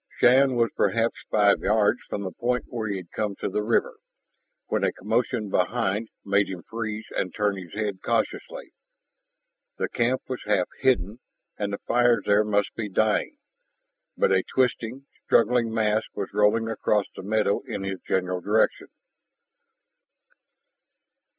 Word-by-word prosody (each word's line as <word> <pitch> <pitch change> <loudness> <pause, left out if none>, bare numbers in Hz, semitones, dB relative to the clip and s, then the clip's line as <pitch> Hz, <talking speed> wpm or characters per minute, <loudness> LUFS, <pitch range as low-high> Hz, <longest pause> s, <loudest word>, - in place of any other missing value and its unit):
Shann 130 +1 +5
was 115 -1 +2
perhaps 115 0 +1
five 105 -1 +4
yards 105 +3 +2
from 100 - -3
the 95 - -4
point 125 +7 -1
where 115 -3 -3
he 100 -2 -2
had 90 -2 -10
come 105 -2 -2
to - - -4
the 105 - -1
river, 110 +2 0 0.7
when - - -1
a - - +2
commotion 110 +1 -1
behind 105 +2 0 0.2
made 100 0 +2
him 90 -3 -6
freeze 110 -1 -5
and 90 - -1
turn 105 +1 0
his 95 -1 -9
head 105 -3 -3
cautiously. - - -2 1.0
The - - -1
camp 125 +2 0
was 130 -1 -4
half 100 -4 +2
hidden, 115 -4 +1 0.4
and 100 -1 -3
the 100 - -2
fires 120 0 +3
there 105 +1 +4
must 105 -1 0
be 110 -2 -4
dying. 110 - +1 0.8
But 480 - +3
a - - +4
twisting, 125 0 -1 0.2
struggling 115 0 +3
mass 110 -1 +2
was 100 - -4
rolling 105 +2 +3
across 105 -2 +1
the - - -7
meadow 105 0 +1
in 110 -5 -4
his 95 -1 -4
general 90 -1 -1
direction. 105 +4 +1
110 Hz, 150 wpm, -25 LUFS, 100-115 Hz, 1.0 s, Shann